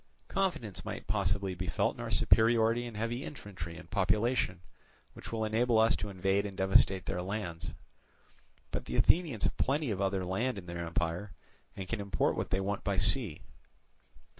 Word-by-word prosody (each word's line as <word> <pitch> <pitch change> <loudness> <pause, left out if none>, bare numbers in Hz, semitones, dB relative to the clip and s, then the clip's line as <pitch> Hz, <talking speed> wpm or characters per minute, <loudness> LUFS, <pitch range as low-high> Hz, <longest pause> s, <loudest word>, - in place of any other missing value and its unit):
Confidence 175 - -1
might - - -6
possibly 95 +2 0
be 90 0 -5
felt 80 - +1
in - - -9
our - - -4
superiority 115 +1 +4
in 115 - -8
heavy 115 +4 -2
infantry 90 - -7
and - - -11
population, 105 -1 +1 0.5
which - - -10
will 110 -1 -1
enable 115 +2 +2
us 110 +1 +5
to 105 - -4
invade 95 +1 +1
and 100 -2 -6
devastate 95 0 +4
their 90 - -2
lands. 90 -3 -4 1.0
But - - -3
the 60 - -4
Athenians 160 - +3
have - - 0
plenty 140 -1 +1
of 100 -1 -2
other 95 -1 0
land 110 +6 -1
in 95 - -7
their 85 -1 -5
empire, 85 +4 -2 0.4
and 95 -1 -6
can 115 0 -2
import 100 -1 +1
what - - -2
they 95 - +1
want 100 +1 -2
by 100 -1 0
sea. 100 - +2
100 Hz, 175 wpm, -32 LUFS, 95-115 Hz, 1.0 s, us